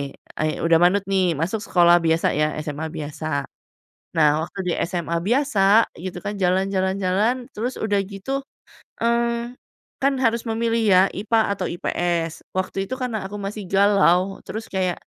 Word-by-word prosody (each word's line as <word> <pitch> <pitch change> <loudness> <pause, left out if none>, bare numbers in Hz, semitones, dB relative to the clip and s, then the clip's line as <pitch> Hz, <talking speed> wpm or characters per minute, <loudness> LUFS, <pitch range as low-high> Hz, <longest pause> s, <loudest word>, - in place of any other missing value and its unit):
e - - -7 0.2
udah 165 -1 +5
manut 185 +3 +4
nih, 185 -4 +2
masuk 175 +9 -1
sekolah 175 -4 +4
biasa 165 0 +2
ya 150 0 +1
SMA 155 +1 -4
biasa. 150 -1 -3 0.7
Nah, 155 0 +3
waktu 195 - -12
di - - +1
SMA 170 -1 -2
biasa 225 -4 +3
gitu 180 0 -6
kan, 205 0 -3
jalan 190 +1 +1
jalan 190 0 0
jalan, 220 +7 0
terus 245 +4 -3
udah 205 -2 0
gitu, 205 +8 -4 0.6
mmm, 235 +1 0 0.4
kan 275 +1 +3
harus 230 0 +2
memilih 230 +1 0
ya 185 -2 +6
IPA 220 +3 0 0.2
atau - - -2
IPS, 170 -1 -2
waktu 190 +1 -2
itu - - -5
karena 220 -6 -2
aku 205 - -8
masih 200 0 -5
galau, 195 -1 +3
terus 220 +1 -6
kayak 185 -2 -1
195 Hz, 155 wpm, -22 LUFS, 175-220 Hz, 0.7 s, ya